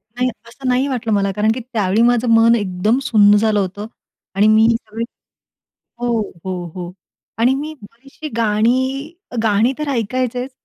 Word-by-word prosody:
नाही, 250 +1 0 0.2
असं 260 +3 -8
नाही 255 +2 +2
वाटलं 230 -4 -2
मला. 200 -1 +1
कारण 215 +1 +2
की 250 - -5
त्यावेळी 205 -1 +1
माझं 240 0 +2
मन 230 +1 +5
एकदम 205 +3 0
सुन्न 205 -4 +5
झालं 215 -1 +2
होतं. 200 +2 -3 0.5
आणि 205 +2 +4
मी 220 +1 +5
सगळे 225 0 -6 1.0
हो, 240 -1 0 0.3
हो, 185 -2 -4
हो 180 -1 -6 0.5
आणि 245 +3 +3
मी 300 +3 -5 0.2
अशी 275 +6 -10
गाणी, 255 +7 0 0.2
अ, - - -7
गाणी 220 +3 +2
तर 300 -1 -3
ऐकायचेच, 250 +1 -2
230 Hz, 160 wpm, -18 LUFS, 210-255 Hz, 1.0 s, मन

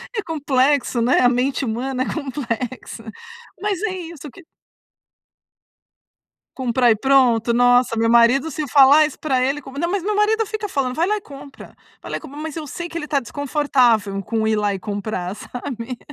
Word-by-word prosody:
É 430 - 0
complexo, 280 -5 +1
né, 240 +3 +3
a 245 - +5
mente 260 +2 0
humana 255 +3 -2
é - - -5
complexa, 255 -5 -5 0.6
mas 405 -3 -2
é 440 - 0
isso 330 -4 -9
que 380 - -15 2.1
Comprar 245 -2 +2
e 220 - +3
pronto. 245 -3 +3
Nossa, 245 -1 +3
meu 230 0 +2
marido 240 +6 +4
se 305 +1 -4
falar 285 +2 +6
isso 300 - -4
pra 265 -4 0
ele 275 +3 -1 0.2
não. 340 +2 -1
Mas 395 -2 -1
meu 420 +1 -1
marido 435 +1 +2
fica 435 0 -4
falando: 260 -5 -1
"Vai 335 +2 +2
lá 425 +1 0
e - - -13
compra, 280 -5 -13 0.3
vai - - -9
lá - - -2
e - - -6
compra!". 290 -2 -11
Mas 315 0 -6
eu 310 - -5
sei 345 +5 -6
que 335 - -9
ele 335 - -3
está 290 -2 0
desconfortável 245 -7 +1
com 220 +3 -1
ir 220 - +2
lá 205 -1 0
e 195 - -4
comprar, 200 -2 -4
sabe. 245 -1 -7
270 Hz, 185 wpm, -20 LUFS, 235-310 Hz, 2.1 s, falar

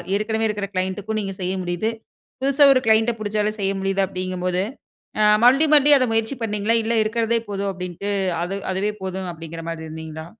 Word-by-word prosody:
ஏற்கனவே 220 +2 0
இருக்கிற 205 -1 -3
க்ளைன்டு 190 +2 -2
க்கும் 220 +1 -2
நீங்க 195 -1 -4
செய்ய 180 +1 -1
முடியுது, 175 +5 -1 0.5
புதுசா 280 +2 +4
ஒரு 255 - +3
க்ளையண்ட் 220 +1 +4
ட - - -5
புடிச்சாலே 210 0 -1
செய்ய 195 0 0
முடியுது 195 0 0
அப்டிங்கும்போது. 185 -1 -2 0.6
அ - - +4 0.2
மறுபடியும் 280 +5 +5
மறுபடியும் 290 -1 +6
அத 255 - +2
முயற்சி 225 +4 0
பண்ணீங்களா? 210 +1 0
இல்ல 225 +1 -1
இருக்கிறதே 230 +1 0
போதும் 200 0 -2
அப்டின்ட்டு 180 +2 -5 0.3
அது 185 +3 -3 0.2
அதுவே 200 +3 -1
போதும் 190 0 -4
அப்டிங்கிற 165 0 -8
மாரி 160 -1 -6
இருந்தீங்களா? 160 0 -8
200 Hz, 180 wpm, -22 LUFS, 185-225 Hz, 0.6 s, மறுபடியும்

